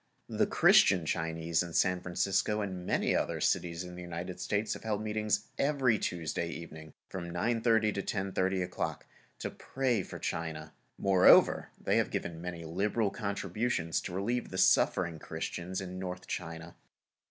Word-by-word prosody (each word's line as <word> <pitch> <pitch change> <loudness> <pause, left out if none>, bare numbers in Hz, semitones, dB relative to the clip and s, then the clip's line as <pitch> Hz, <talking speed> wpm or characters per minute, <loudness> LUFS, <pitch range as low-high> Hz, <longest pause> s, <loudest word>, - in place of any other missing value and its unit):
The - - +1
Christian 90 -4 +5
Chinese 80 0 0
in 85 -2 -5
San 90 0 +2
Francisco, 95 +4 0
and 95 -3 -5
many - - +1
in - - +3
other - - -2
cities 85 0 0
of 90 0 -8
the 90 - -8
United 90 +1 -6
States, 105 +3 -1
have - - -8
held 105 -1 -1
meetings 105 -1 -1
every 135 -6 +2
Tuesday 85 0 -2
evening, 80 -2 -9
from 85 -2 -6
9:30 110 +3 +2
to 100 - -2
10:30 95 -1 -1
o'clock, 90 - -4 0.3
to - - -4
pray 130 -5 -1
for - - -8
China. 80 -2 -4 0.2
Moreover, 95 -2 +5
they - - +1
have - - +2
given 80 -1 -4
many 85 -1 -6
liberal 100 +5 0
contributions 100 -3 -1
to - - -6
relieve 120 +6 -1
the 95 - -6
suffering 85 -3 +3
Christians 85 +4 -4
in 90 -1 -6
North 90 -1 -5
China. 80 +1 -6
90 Hz, 155 wpm, -31 LUFS, 85-105 Hz, 0.3 s, Christian